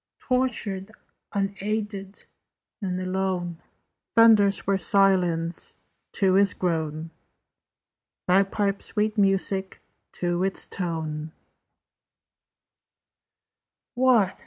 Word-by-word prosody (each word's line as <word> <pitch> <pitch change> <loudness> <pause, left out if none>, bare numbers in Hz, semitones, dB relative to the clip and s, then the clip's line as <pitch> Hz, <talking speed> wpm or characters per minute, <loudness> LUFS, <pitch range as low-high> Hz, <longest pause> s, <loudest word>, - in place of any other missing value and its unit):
Tortured, 220 -7 -1 0.4
unaided, 200 0 -3 0.6
and 185 -2 -2
alone, 185 -2 -2 0.5
Thunders 215 -4 +5
were 195 0 +1
silence 180 -3 +2 0.4
to 190 -3 +2
his 200 0 +3
groan, 160 -2 -2 1.1
Bagpipes 195 +2 +1
sweet 215 0 -1
music 195 -1 0 0.3
to 175 0 -1
its 195 0 -1
tone: 160 -3 -4 2.6
"What? 245 -7 +3
195 Hz, 70 wpm, -25 LUFS, 180-205 Hz, 2.6 s, Thunders